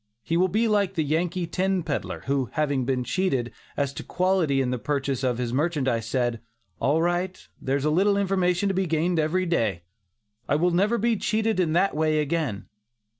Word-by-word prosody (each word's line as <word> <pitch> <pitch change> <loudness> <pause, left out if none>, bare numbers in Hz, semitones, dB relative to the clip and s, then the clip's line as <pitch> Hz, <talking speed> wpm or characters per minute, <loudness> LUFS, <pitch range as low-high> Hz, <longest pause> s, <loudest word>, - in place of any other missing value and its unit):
He 165 - -1
will 180 +2 +4
be 220 +5 +1
like 200 -3 +1
the 160 - +1
Yankee 170 +4 -1
tin 190 +1 0
peddler, 145 -3 -3
who, 135 -4 0
having 145 -4 0
been 130 -1 0
cheated 125 - -1 0.2
as 140 -1 0
to - - -6
quality 180 -7 +1
in 130 -2 0
the 125 - -2
purchase 140 -1 -2
of 125 -2 +1
his 120 -1 -2
merchandise, 135 -6 0
said: 120 -1 -1 0.4
"All 155 +4 +2
right, 175 +1 -2
there's 135 +2 -1
a 150 - +2
little 200 +5 +3
information 190 -1 +1
to 195 - +1
be 190 0 0
gained 165 +2 +1
every 170 +4 +1
day; 110 - 0 0.7
I 140 - +3
will 175 +4 +2
never 200 +7 +2
be 230 0 +1
cheated 220 0 0
in 165 -4 +1
that 185 +1 +2
way 155 0 +2
again." 150 -8 -1
160 Hz, 190 wpm, -25 LUFS, 135-185 Hz, 0.7 s, will